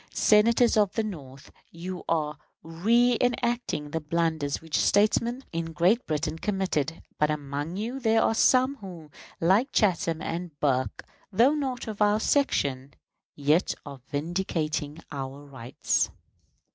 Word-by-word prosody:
Senators 230 +2 +4
of 205 -3 +3
the 225 - 0
North, 140 -10 -8 0.2
you 180 +2 -7
are 150 -2 -1 0.3
reënacting 235 -2 +1
the 160 - -1
blunders 160 -2 -1
which 160 -1 -2
statesmen 230 +5 +2
in 165 0 -3
Great 185 +9 +2
Britain 155 +1 -2
committed; 180 -6 -2 0.2
but 150 - +3
among 145 +3 -3
you 235 +6 -3
there 225 -2 +3
are - - +2
some 255 +4 +3
who, 175 - -10 0.3
like 195 +11 +3
Chatham 175 -6 +1
and 165 -2 -5
Burke, 130 -3 0 0.3
though 235 +9 +4
not 265 -5 -3
of 215 -1 -6
our 210 +1 +4
section, 140 - 0 0.4
yet 150 +5 +2
are 140 -3 -9
vindicating 155 -1 -2
our 140 0 -6
rights. 130 -3 -1
170 Hz, 130 wpm, -27 LUFS, 150-220 Hz, 0.4 s, Senators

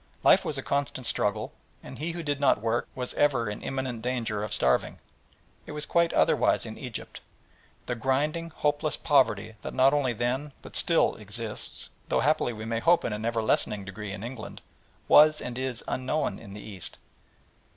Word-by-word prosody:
Life - - +6
was - - -3
a - - -4
constant 140 -2 -2
struggle, - - 0 0.3
and - - -10
he 165 +3 -2
who 170 0 -5
did 145 -2 -1
not 140 -5 +4
work 115 +2 0
was 125 -1 -2
ever 130 -6 +2
in 105 - -7
imminent 130 -4 -3
danger 115 -4 -1
of 105 - -4
starving. 65 0 +1 0.7
It - - -6
was 150 0 -3
quite 170 -1 +2
otherwise - - +3
in - - -7
Egypt. - - -7 0.6
The 125 - -2
grinding, 145 +7 0
hopeless 150 -1 -1
poverty 130 -8 +2
that - - -6
not 130 +2 +5
only 135 -4 +1
then 130 +5 -2
but - - -10
still 165 -1 +4
exists, 105 +1 -5 0.2
though - - +2
happily 145 -2 +2
we 110 -1 -7
may 115 0 -1
hope 170 +8 +4
in - - -1
an 105 +1 -4
ever 115 -1 0
lessening 105 -2 0
degree 100 +1 -6
in 100 +1 -6
England, 120 -2 -7 0.4
was 150 0 +7
and 120 - -5
is 130 -2 -3
unknown 130 +4 -1
in 100 -3 -11
the 105 - -8
East. 95 -5 -8
125 Hz, 180 wpm, -28 LUFS, 110-145 Hz, 0.7 s, was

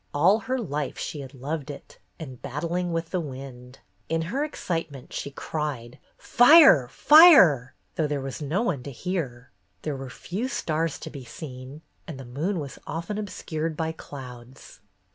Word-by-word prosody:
All 185 +9 +4
her 255 +3 -2
life 150 - -3
she 150 - -5
had 135 +1 -10
loved 145 +3 -5
it, 145 - -10 0.2
and 130 -6 -9
battling 170 +6 -3
with 165 0 -3
the 185 - 0
wind. 130 -4 -9 0.3
In 165 0 0
her 280 +2 0
excitement 165 - -5
she - - -4
cried 140 -4 -5 0.2
"Fire! 245 - +7
Fire!'' 200 - +7 0.2
though 155 - 0
there 145 -1 -2
was 135 -2 -6
no 155 +9 -1
one 160 - -1
to 140 - -8
hear. 130 -5 -4 0.3
There 150 -2 -2
were 135 -1 -7
few 190 - -4
stars 165 - -2
to - - -7
be 140 - -9
seen, 130 +3 -9 0.2
and 150 -5 -7
the 135 - -8
moon 160 +10 -2
was 140 -3 -7
often 170 +7 -4
obscured 165 -6 -4
by 160 -1 -1
clouds. 130 -5 -11
150 Hz, 160 wpm, -25 LUFS, 135-175 Hz, 0.3 s, Fire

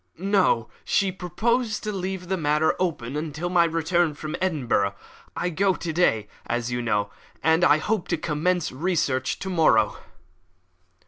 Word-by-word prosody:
"No; 185 - +2 0.2
she 195 -2 +1
proposed 220 +6 -1
to 215 - -2
leave 190 -2 -4
the 190 - 0
matter 155 -2 +2
open 145 -8 -2
until 155 +2 -3
my 175 -1 +4
return 165 -1 +1
from 155 +1 -5
Edinburgh. 125 - 0 0.4
I 175 - -1
go 190 +2 +2
to 165 -1 -4
day, 115 -11 +2 0.2
as 120 +1 -2
you 120 0 -1
know, 105 -3 0 0.3
and 160 +2 +3
I 150 -4 +6
hope 205 +3 -1
to 170 - 0
commence 165 +2 0
my 130 - -12
research 145 -8 0
to 190 - -5
morrow." 120 - +3
165 Hz, 155 wpm, -25 LUFS, 145-185 Hz, 0.4 s, I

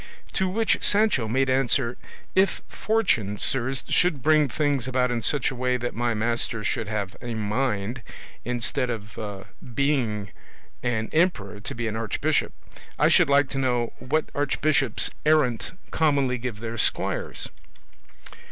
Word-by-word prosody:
To 190 -1 +1
which 220 +4 +1
Sancho 205 - +3
made 130 +4 +1
answer, 130 -1 +2 0.4
"If 190 +1 +2
fortune, 150 - 0
sirs, 130 +3 0
should 165 -8 +2
bring 155 -2 +4
things 145 -3 0
about 125 -1 +1
in 120 -1 -1
such 135 +7 +1
a - - -6
way 125 0 +1
that 120 0 -3
my 120 0 0
master 115 0 -1
should 115 +1 -1
have 100 -3 -3
a 120 -1 -4
mind, 110 +1 -1 0.4
instead 125 +2 -1
of 105 -3 -6 0.3
being 120 -8 0 0.5
an 110 -3 -1
emperor, 110 - +1
to 105 - -6
be 115 0 -2
an 110 - -2
archbishop, 110 -2 0 0.5
I - - +4
should - - +5
like 140 0 +5
to 135 - -3
know 125 -3 0
what 150 +5 -1
archbishops 140 -3 +1
errant 150 -7 +2 0.2
commonly 140 -5 +2
give 115 -3 -5
their 115 0 -4
squires?" - - 0
125 Hz, 145 wpm, -25 LUFS, 115-140 Hz, 0.5 s, should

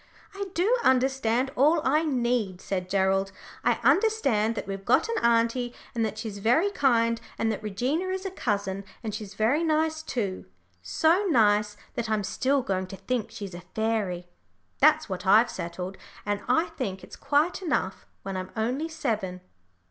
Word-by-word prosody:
"I 400 0 -4
do 400 +8 +3
understand 260 -1 +2
all 305 +6 +4
I 310 0 +3
need," 240 - 0
said 185 -2 -3
Gerald; 195 0 +1 0.3
"I 240 - +4
understand 275 - +3
that - - -4
we've 195 0 -5
got 240 - +3
an 460 0 -2
auntie, 235 +1 +2 0.2
and 230 - 0
that 215 -1 -2
she's 215 -2 -5
very 250 - +3
kind, 230 - +2 0.2
and 225 0 +1
that 215 - -4
Regina 245 - -1
is 375 +1 -3
a 385 - -3
cousin, 200 - -2 0.2
and 215 -2 -3
she's 200 -2 -7
very 240 +10 +2
nice 315 0 +1
too 210 -11 -3 0.4
so 325 - +2
nice 210 -5 +3 0.2
that 235 -2 -3
I'm 215 -1 +1
still 270 +6 +1
going 190 -3 -1
to 195 - -8
think 250 0 -2
she's 200 -3 -7
a 175 - -8
fairy. 210 -6 -1 0.5
That's - - +5
what 185 0 -5
I've 220 +5 +6
settled, 180 +2 -5 0.3
and 205 -1 -1
I 325 +1 +3
think 195 -8 -3
it's - - -10
quite 295 +7 +1
enough 290 - -2 0.2
when 195 0 -4
I'm 185 0 -4
only 255 +9 -1
seven." 215 - -3
230 Hz, 170 wpm, -27 LUFS, 195-280 Hz, 0.5 s, I've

